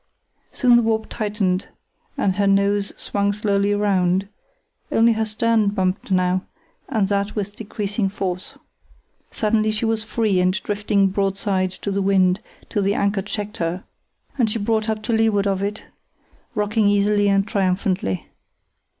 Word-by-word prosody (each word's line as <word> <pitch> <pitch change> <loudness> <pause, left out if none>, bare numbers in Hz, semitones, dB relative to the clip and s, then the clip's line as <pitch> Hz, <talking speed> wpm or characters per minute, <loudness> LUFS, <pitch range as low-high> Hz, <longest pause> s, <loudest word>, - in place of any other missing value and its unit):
Soon 245 -2 +4
her - - +4
warp 220 -1 0
tightened 205 -4 -1 0.5
and 190 -1 0
her 200 -1 +2
nose 200 +1 +2
swung 200 0 0
slowly 205 -1 +1
round; 190 -2 +1 0.6
only 230 +1 +4
her 220 0 0
stern 220 0 +1
bumped 190 -1 -1
now, 185 0 +2 0.5
and 220 -7 +1
that 200 +1 -1
with 205 -1 -3
decreasing 205 -1 -2
force. 185 -2 -4 0.7
Suddenly 215 0 +1
she 215 +2 -1
was 225 -1 0
free 220 -4 0
and 180 +1 +2
drifting 205 -1 +1
broadside 195 -1 0
to 200 - -1
the 200 0 0
wind 190 -1 +3 0.3
till 205 - -1
the 200 +1 +1
anchor 200 0 +1
checked 210 +2 -5
her 175 +2 -2 0.6
and 230 -3 +3
she 215 - -1
brought 220 +1 0
up 215 -1 -2
to 235 - -1
leeward 220 -2 +2
of 195 -1 0
it, 205 +1 -3 0.7
rocking 210 0 +1
easily 205 0 +3
and 195 0 +2
triumphantly. 185 - -1
205 Hz, 150 wpm, -22 LUFS, 195-215 Hz, 0.7 s, Soon